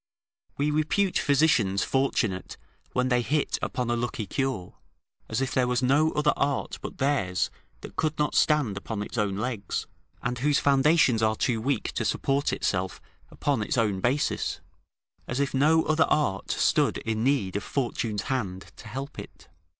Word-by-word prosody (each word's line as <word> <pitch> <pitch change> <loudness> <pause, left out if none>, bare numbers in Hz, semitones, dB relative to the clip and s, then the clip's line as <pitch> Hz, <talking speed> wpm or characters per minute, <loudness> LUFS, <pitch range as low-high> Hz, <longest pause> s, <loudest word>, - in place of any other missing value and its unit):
We 145 +1 +1
repute 165 +6 +1
physicians 130 -10 +3
fortunate 115 -8 -1 0.4
when 125 0 +1
they 125 -1 +3
hit 150 +5 0
upon 125 -2 -2
a - - +2
lucky 120 -2 -3
cure, 130 -6 -2 0.6
as 110 +4 -1
if 135 -1 -1
there 125 -1 +2
was 125 +1 0
no 145 +5 +3
other 150 0 +2
art 140 -1 -1
but - - -7
theirs 130 -10 0 0.3
that - - -11
could 155 0 0
not 150 0 0
stand 145 -10 +2
upon 105 +1 -4
its 120 - -5
own 100 -2 0
legs, 110 -4 -3 0.4
and 125 0 -2
whose 145 +2 +2
foundations 140 -3 +4
are 110 0 +2
too 115 0 0
weak 135 0 -1
to - - -2
support 140 +1 0
itself 95 0 -1 0.3
upon 140 -6 -1
its 105 - -1
own 105 -5 +1
basis; 135 +8 0 0.7
as 120 - -2
if 140 -2 0
no 155 +4 +4
other 155 +1 +3
art 100 -11 0
stood - - +2
in 110 0 -2
need 130 -9 +1
of 100 - -1
Fortune's 115 -5 -2
hand 95 -8 -3
to 110 - -11
help 135 +6 -6
it. - - -11
130 Hz, 165 wpm, -27 LUFS, 110-145 Hz, 0.7 s, foundations